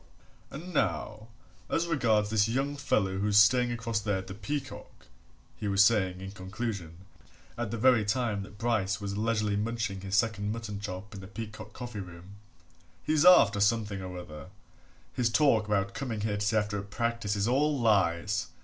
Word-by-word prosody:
"And 175 +6 -8
now 105 - -1 0.4
as 165 - +1
regards 110 -10 +1
this 105 -1 +3
young 135 +4 -1
fellow 100 -9 0
who's 105 0 +2
staying 120 +4 +5
across 115 -2 -2
there 105 -2 -1
at 95 - -6
the 95 - -8
Peacock," 135 +8 -6 0.5
he 105 - -5
was 100 0 +5
saying 95 -5 +2
in 95 0 -7
conclusion, 95 -3 -6 0.5
at 120 -2 -3
the 115 - -3
very 120 -1 +4
time 105 -1 -1
that 100 +1 -11
Bryce 110 -3 0
was 100 -1 -4
leisurely 105 -1 0
munching 110 -2 -2
his 95 0 -3
second 105 -1 +1
mutton 110 -3 -5
chop 100 0 -7
in 100 - -8
the 95 - -10
Peacock 110 +1 -8
coffee 120 -4 -7
room, 90 +1 -10 0.7
"he's 155 0 +2
after 110 - +7
something 105 -1 +1
or 90 -1 -7
other 75 -5 -9 0.7
his 120 -2 +1
talk 115 -2 +3
about 100 -2 0
coming 120 -6 -4
here 105 -1 -1
to 100 - -2
see 110 +1 +2
after 105 -1 -1
a - - -3
practice 110 +1 -2
is 100 +1 0
all 140 +3 +2
lies! 100 -2 +1
105 Hz, 175 wpm, -29 LUFS, 100-115 Hz, 0.7 s, after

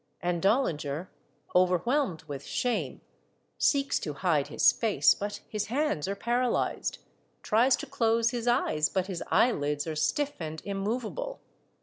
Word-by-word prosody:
And 175 -1 -1
Dollinger, 175 - 0 0.4
overwhelmed 185 - +2
with 140 -1 -7
shame, 245 - -2 0.6
seeks 280 -1 +2
to 150 - -4
hide 150 -2 +1
his - - +4
face, 225 -3 +3
but 205 +1 -5
his 210 -1 -3
hands 255 - 0
are 200 - -2
paralyzed; 240 +4 0 0.5
tries 240 +5 +4
to - - -6
close 230 -3 +1
his 240 -1 -4
eyes, 155 -10 +2
but 190 -2 0
his 190 -3 -5
eyelids 150 -8 +2
are 160 -1 -4
stiff 290 - 0
and 160 -1 -5
immovable. 230 - -3
205 Hz, 135 wpm, -28 LUFS, 165-245 Hz, 0.6 s, his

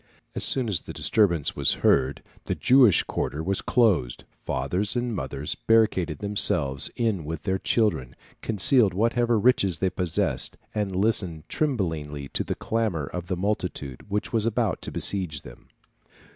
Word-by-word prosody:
As - - -3
soon 130 -3 +2
as 100 -6 0
the - - -9
disturbance 85 -9 +1
was - - +2
heard 65 0 +2 0.2
the - - -2
Jewish 125 -6 +4
quarter 75 +3 -4
was 95 +3 -1
closed; 100 - +1 0.2
fathers 90 - -1
and 120 -2 -2
mothers 70 -1 -4
barricaded 100 -8 +1
themselves 70 -9 +2
in 110 -8 -1
with 80 +1 -6
their 95 -1 -1
children, 95 - 0 0.3
concealed 105 -1 +3
whatever 115 +2 +1
riches 100 -6 +2
they 95 -1 -1
possessed, 90 -3 0 0.2
and 100 -3 -2
listened 95 -6 0
tremblingly 80 - -2
to - - -2
the - - -4
clamour 110 -10 -2
of 90 +4 -7
the 90 - -2
multitude 90 -8 -4
which 105 +3 -3
was 115 -1 +1
about 115 -4 -1
to - - -7
besiege 90 -8 0
them. - - -14
95 Hz, 150 wpm, -25 LUFS, 80-110 Hz, 0.3 s, Jewish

